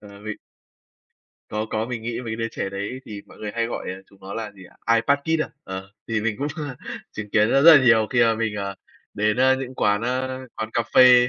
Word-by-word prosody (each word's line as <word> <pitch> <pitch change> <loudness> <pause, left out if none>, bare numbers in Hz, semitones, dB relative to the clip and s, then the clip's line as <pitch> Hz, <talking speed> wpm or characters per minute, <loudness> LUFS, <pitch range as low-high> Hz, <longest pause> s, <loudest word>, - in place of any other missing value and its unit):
Ờ, 100 -1 -13
vì 110 -1 -5 1.1
Có, 110 +1 -2
có, 110 +1 -1
mình 120 -3 -4
nghĩ 120 +1 -3
mấy 115 - -5
cái 110 - -3
đứa 115 0 -2
trẻ - - -3
đấy 100 +6 -4
thì 105 -2 -8
mọi - - -16
người 105 - -4
hay 115 0 +1
gọi 120 - -5
đấy 95 - -4
là 95 - -13
chúng 100 - -21
nó 95 +1 -7
là 110 -2 -4
gì 100 -2 -15
ạ? 115 +5 -1
iPad 140 +5 +3
kid 160 +1 +1
à? - - -6 0.2
Ờ, 95 +1 -6 0.2
thì 110 -1 0
mình 110 -1 -1
cũng 145 +2 -1 0.6
chứng 105 -1 -6
kiến 105 +1 +4
rất 135 - +5
là 155 -5 +9
nhiều 110 -3 +5
khi 120 - +3
mà 115 -1 +4
mình, 110 -1 -1
ờ, 100 -1 -3 0.4
đến, 105 +2 +1
à, 130 +1 +5
những 130 -1 -5
quán, 105 -1 +2
a, 130 +2 -1 0.3
quán 110 0 -3
cà 120 - +2
phê 125 -1 +8
115 Hz, 250 wpm, -23 LUFS, 105-125 Hz, 1.1 s, là